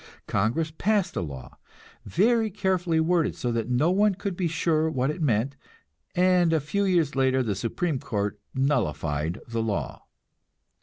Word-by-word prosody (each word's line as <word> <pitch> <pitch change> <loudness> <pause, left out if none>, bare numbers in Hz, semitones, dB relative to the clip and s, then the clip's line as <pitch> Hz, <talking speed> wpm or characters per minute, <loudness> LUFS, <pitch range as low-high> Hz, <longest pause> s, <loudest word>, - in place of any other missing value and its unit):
Congress 125 +11 0
passed 200 -1 +1
a - - -1
law, 70 -6 -8 0.5
very 225 +4 +2
carefully 185 -4 0
worded 165 0 +1
so 120 - -2
that 115 0 -2
no 125 +8 +2
one 205 +1 +3
could 195 -1 -4
be 175 -1 0
sure 160 -1 +1
what 130 -1 0
it 165 - -7
meant, 130 -1 +1 0.6
and 180 -1 +4
a 160 - +3
few 200 +8 -1
years 170 -7 +2
later 130 -1 +2
the 110 -4 -1
Supreme 130 - -2
Court 105 -2 -3 0.2
nullified 85 - 0
the 115 -1 -2
law. 110 -3 -3
155 Hz, 155 wpm, -26 LUFS, 115-180 Hz, 0.6 s, and